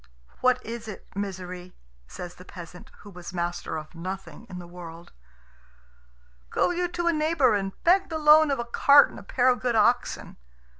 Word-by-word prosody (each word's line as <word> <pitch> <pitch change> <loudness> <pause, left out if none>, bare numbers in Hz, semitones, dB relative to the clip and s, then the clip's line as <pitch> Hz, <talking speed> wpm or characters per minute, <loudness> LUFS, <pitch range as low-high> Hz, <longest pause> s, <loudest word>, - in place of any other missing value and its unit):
"What 255 0 +2
is 230 0 -6
it, 210 - -9
Misery?" 185 -2 -6 0.3
says 175 - -8
the 180 - -14
peasant, 180 -1 -11
who 205 - -12
was 180 0 -9
master 175 -2 -3
of 155 +1 -9
nothing 190 +6 -7
in 185 - -7
the 175 - -8
world. 170 -1 -11 1.4
"Go - - +1
you 355 0 0
to 345 0 -4
a 340 - +3
neighbour 305 -5 +2
and 195 -1 -1
beg 375 +3 +4
the 320 - -2
loan 305 0 +6
of 275 - +1
a 235 - -3
cart 280 +4 +6
and - - -10
a - - -11
pair 245 +5 0
of 250 - +2
good 245 -2 0
oxen." 235 +3 +1
205 Hz, 185 wpm, -26 LUFS, 180-280 Hz, 1.4 s, loan